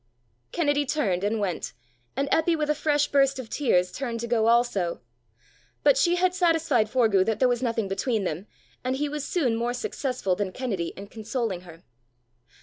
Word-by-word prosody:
Kennedy 290 Hz, -3 st, +1 dB
turned 215 Hz, -, 0 dB
and 215 Hz, +2 st, 0 dB
went, 190 Hz, -4 st, -3 dB, 0.4 s
and 280 Hz, -, 0 dB
Eppy 325 Hz, +1 st, +3 dB
with 300 Hz, -1 st, 0 dB
a -, -, +3 dB
fresh 295 Hz, -1 st, +1 dB
burst 275 Hz, -1 st, +3 dB
of 255 Hz, -4 st, -7 dB
tears 180 Hz, -11 st, +2 dB
turned 240 Hz, -4 st, -4 dB
to -, -, -2 dB
go 225 Hz, -2 st, +2 dB
also. 230 Hz, -7 st, +2 dB, 0.8 s
But -, -, +6 dB
she 350 Hz, -8 st, +3 dB
had 360 Hz, 0 st, +2 dB
satisfied 330 Hz, -, +2 dB
Forgue 220 Hz, -6 st, +3 dB
that 220 Hz, -2 st, +1 dB
there 255 Hz, -, +4 dB
was 245 Hz, -1 st, 0 dB
nothing 230 Hz, -4 st, -1 dB
between 205 Hz, +3 st, -1 dB
them, 180 Hz, +3 st, -4 dB, 0.4 s
and 255 Hz, +1 st, 0 dB
he 295 Hz, +2 st, -1 dB
was 295 Hz, 0 st, -4 dB
soon 275 Hz, -8 st, 0 dB
more 240 Hz, +2 st, -1 dB
successful 250 Hz, -8 st, -2 dB
than 190 Hz, -1 st, -3 dB
Kennedy 205 Hz, -10 st, -2 dB
in 200 Hz, -, -7 dB
consoling 220 Hz, -2 st, -3 dB
her. 170 Hz, -1 st, -14 dB
240 Hz, 180 wpm, -26 LUFS, 205-290 Hz, 0.8 s, But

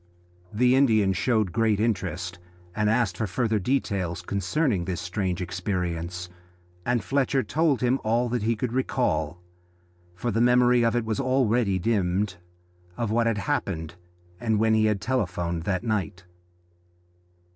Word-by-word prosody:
The 125 Hz, +4 st, +3 dB
Indian 110 Hz, -8 st, +4 dB
showed 110 Hz, -2 st, +1 dB
great 110 Hz, +1 st, +1 dB
interest 90 Hz, -5 st, -2 dB, 0.4 s
and 105 Hz, -1 st, +1 dB
asked 110 Hz, -5 st, +1 dB
for 110 Hz, -, -1 dB
further 110 Hz, +2 st, 0 dB
details 95 Hz, -7 st, -1 dB
concerning 100 Hz, -, 0 dB
this 90 Hz, -2 st, -3 dB
strange 90 Hz, -1 st, -2 dB
experience, 90 Hz, -2 st, -3 dB, 0.6 s
and 120 Hz, -1 st, +1 dB
Fletcher 135 Hz, -1 st, +1 dB
told 150 Hz, +2 st, +1 dB
him 125 Hz, +2 st, +2 dB
all 115 Hz, +3 st, +1 dB
that 120 Hz, -1 st, -1 dB
he 115 Hz, +2 st, +1 dB
could 115 Hz, +2 st, -3 dB
recall 90 Hz, -, -1 dB, 0.7 s
for 120 Hz, +6 st, -2 dB
the 115 Hz, +2 st, +1 dB
memory 125 Hz, 0 st, +4 dB
of 115 Hz, +1 st, +2 dB
it 120 Hz, -2 st, 0 dB
was 110 Hz, -1 st, -2 dB
already 120 Hz, -6 st, +2 dB
dimmed 95 Hz, -1 st, 0 dB, 0.6 s
of 115 Hz, -3 st, -1 dB
what 115 Hz, +1 st, +2 dB
had 115 Hz, -2 st, +1 dB
happened 85 Hz, -4 st, -2 dB, 0.5 s
when 110 Hz, 0 st, +2 dB
he 110 Hz, 0 st, +3 dB
had 105 Hz, -3 st, +1 dB
telephoned 90 Hz, -8 st, -2 dB
that 95 Hz, 0 st, -1 dB
night. 100 Hz, -5 st, -2 dB
105 Hz, 140 wpm, -26 LUFS, 90-120 Hz, 0.7 s, Indian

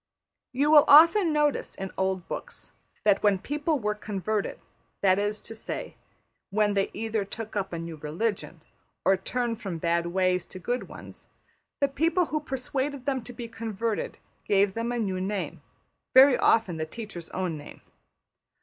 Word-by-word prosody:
You 280 Hz, +4 st, +2 dB
will 300 Hz, -2 st, +9 dB
often 335 Hz, +4 st, +7 dB
notice 295 Hz, -1 st, +1 dB
in 190 Hz, 0 st, -5 dB
old 190 Hz, -2 st, -1 dB
books -, -, -7 dB, 0.3 s
that 205 Hz, -2 st, +4 dB
when 205 Hz, -2 st, +4 dB
people 295 Hz, -, -1 dB
were 210 Hz, -4 st, -1 dB
converted, 210 Hz, 0 st, -3 dB, 0.4 s
that 190 Hz, -1 st, +4 dB
is 205 Hz, +1 st, -1 dB
to -, -, -8 dB
say, 225 Hz, -, -6 dB, 0.5 s
when 210 Hz, 0 st, +2 dB
they 195 Hz, -1 st, +1 dB
either 220 Hz, 0 st, -2 dB
took 215 Hz, +2 st, -7 dB
up 195 Hz, -2 st, -2 dB
a 170 Hz, -, -3 dB
new 165 Hz, -1 st, -6 dB
religion 175 Hz, +9 st, -3 dB, 0.4 s
or 195 Hz, -, +5 dB
turned 235 Hz, +4 st, -3 dB
from 185 Hz, -5 st, -4 dB
bad 170 Hz, +1 st, 0 dB
ways 185 Hz, 0 st, +1 dB
to -, -, -10 dB
good 245 Hz, +7 st, -3 dB
ones, -, -, -11 dB, 0.5 s
the 280 Hz, -, +5 dB
people 330 Hz, +6 st, +1 dB
who 305 Hz, -, +2 dB
persuaded 270 Hz, 0 st, -3 dB
them 265 Hz, -4 st, -1 dB
to 245 Hz, -, -9 dB
be 240 Hz, -1 st, -7 dB
converted 225 Hz, -1 st, -3 dB, 0.3 s
gave 200 Hz, -1 st, +3 dB
them 230 Hz, +2 st, -2 dB
a 245 Hz, -, -1 dB
new 190 Hz, -5 st, -1 dB
name, 195 Hz, +1 st, -3 dB, 0.5 s
very 265 Hz, 0 st, +9 dB
often 200 Hz, -10 st, +3 dB
the 155 Hz, 0 st, -3 dB
teacher's 200 Hz, -4 st, -8 dB
own 185 Hz, -3 st, -2 dB
name. 145 Hz, -1 st, -11 dB
210 Hz, 165 wpm, -27 LUFS, 190-255 Hz, 0.5 s, will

